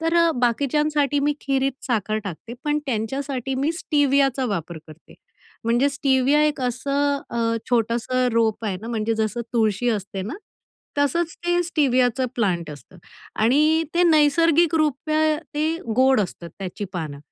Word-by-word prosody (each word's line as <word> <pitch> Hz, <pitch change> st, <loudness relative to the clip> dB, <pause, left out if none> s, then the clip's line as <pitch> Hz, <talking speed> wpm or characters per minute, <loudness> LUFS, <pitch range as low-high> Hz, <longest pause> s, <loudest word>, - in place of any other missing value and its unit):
तर 335 Hz, +1 st, +3 dB
बाकीच्यांसाठी 290 Hz, +4 st, +1 dB
मी 290 Hz, +1 st, +1 dB
खिरीत 270 Hz, -1 st, 0 dB
साखर 215 Hz, -3 st, 0 dB
टाकते 200 Hz, +6 st, -7 dB
पण 295 Hz, 0 st, +1 dB
त्यांच्यासाठी 265 Hz, +3 st, -2 dB
मी 285 Hz, +5 st, 0 dB
स्टिवियाचा 280 Hz, -5 st, +1 dB
वापर 170 Hz, -5 st, -4 dB
करते. 155 Hz, +1 st, -15 dB, 0.5 s
म्हणजे 240 Hz, +4 st, +2 dB
स्टिविया 275 Hz, +1 st, +2 dB
एक 300 Hz, -3 st, 0 dB
असं 280 Hz, +3 st, 0 dB
अ, 230 Hz, -1 st, 0 dB
छोटंसं 240 Hz, +2 st, +1 dB
रोप 225 Hz, -1 st, +1 dB
आहे 195 Hz, -3 st, -1 dB
ना, 225 Hz, -, -7 dB
म्हणजे 225 Hz, -1 st, -1 dB
जसं 220 Hz, +1 st, -1 dB
तुळशी 225 Hz, 0 st, +1 dB
असते 200 Hz, -3 st, -2 dB
ना, 210 Hz, -, -5 dB, 0.6 s
तसंच 330 Hz, +4 st, +1 dB
ते 350 Hz, 0 st, +2 dB
स्टिवियाचं 260 Hz, -6 st, +1 dB
प्लांट 180 Hz, -8 st, -1 dB
असतं 150 Hz, +5 st, -13 dB, 0.5 s
आणि 305 Hz, +7 st, +3 dB
ते 350 Hz, -, +3 dB
नैसर्गिकरूपे 310 Hz, -1 st, +3 dB
त्या 310 Hz, -1 st, +2 dB, 0.2 s
ते 315 Hz, +2 st, 0 dB, 0.2 s
गोड 260 Hz, -2 st, +4 dB
असतं 175 Hz, -3 st, -5 dB
त्याची 195 Hz, +2 st, -5 dB
पानं. 155 Hz, -5 st, -5 dB
260 Hz, 140 wpm, -23 LUFS, 225-295 Hz, 0.6 s, गोड